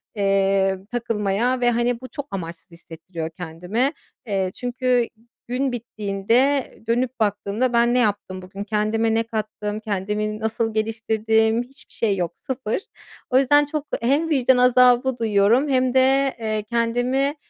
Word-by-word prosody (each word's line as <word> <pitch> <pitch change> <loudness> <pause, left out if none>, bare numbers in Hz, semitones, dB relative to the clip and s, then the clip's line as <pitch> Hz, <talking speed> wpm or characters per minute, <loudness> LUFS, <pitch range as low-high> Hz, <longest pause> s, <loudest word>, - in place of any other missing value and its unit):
eee, 195 -1 +2
takılmaya. 235 +1 0
Ve 240 0 +4
hani, 240 +1 0
bu 255 - -7
çok 285 -2 -6
amaçsız 170 -2 -7
hissettiriyor 165 0 -8
kendimi, 180 - -2 0.3
eee, 195 -4 -1
çünkü 245 -1 0 0.4
gün 255 +2 -1
bittiğinde 235 +4 0 0.2
dönüp 245 +2 0
baktığımda 210 +4 0
"Ben 235 0 +3
ne 250 - +3
yaptım 205 -4 -1
bugün, 195 +2 -7
kendime 215 +2 0
ne 225 0 +2
kattım, 215 -2 -4
kendimi 210 +1 -2
nasıl 225 0 -1
geliştirdim?" 220 +1 +1
hiçbir 270 +4 -14
şey 205 -4 0
yok, 175 -2 -3
sıfır. 260 - -3 0.5
O 255 - +3
yüzden 290 +2 +5
çok 295 0 -4 0.2
hem 285 +7 +1
vicdan 260 -4 +3
azabı 250 0 +4
duyuyorum 225 +5 +3
hem 255 -2 +2
de, 270 +1 +3
eee, 215 -2 -2
"Kendimi, 245 +4 0
230 Hz, 135 wpm, -22 LUFS, 205-250 Hz, 0.5 s, yüzden